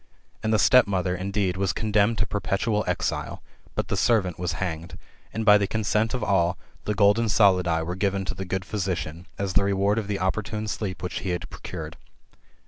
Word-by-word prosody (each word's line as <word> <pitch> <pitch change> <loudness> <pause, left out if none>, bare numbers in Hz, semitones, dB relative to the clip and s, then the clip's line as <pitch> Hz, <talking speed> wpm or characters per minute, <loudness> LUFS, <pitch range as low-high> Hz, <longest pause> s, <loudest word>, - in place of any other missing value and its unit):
And 110 - -1
the 110 - +4
stepmother, 100 -6 +4
indeed, 95 0 -1
was 95 -2 0
condemned 105 +1 +2
to 100 - +1
perpetual 105 +1 -1
exile; - - -2 0.3
but - - -1
the - - -1
servant 95 -8 +2
was 90 -1 -1
hanged; 85 -2 -4 0.3
and 110 +1 -3
by 105 -1 +7
the 100 - 0
consent 110 +2 0
of 125 - -3
all, 90 -3 +2 0.3
the 105 - -1
golden 105 +2 +4
solidi 90 -6 +3
were 85 +2 -3
given 95 0 -1
to - - -3
the 95 +1 -5
good 95 0 -3
physician, 90 -5 -3
as 100 -2 -2
the 100 - +4
reward 100 +2 +2
of 105 - -5
the 100 -1 -1
opportune 105 +3 -2
sleep 95 -2 -4
which 90 - -3
he 95 - -4
had 90 -5 -2
procured. - - -7
100 Hz, 190 wpm, -25 LUFS, 90-105 Hz, 0.3 s, by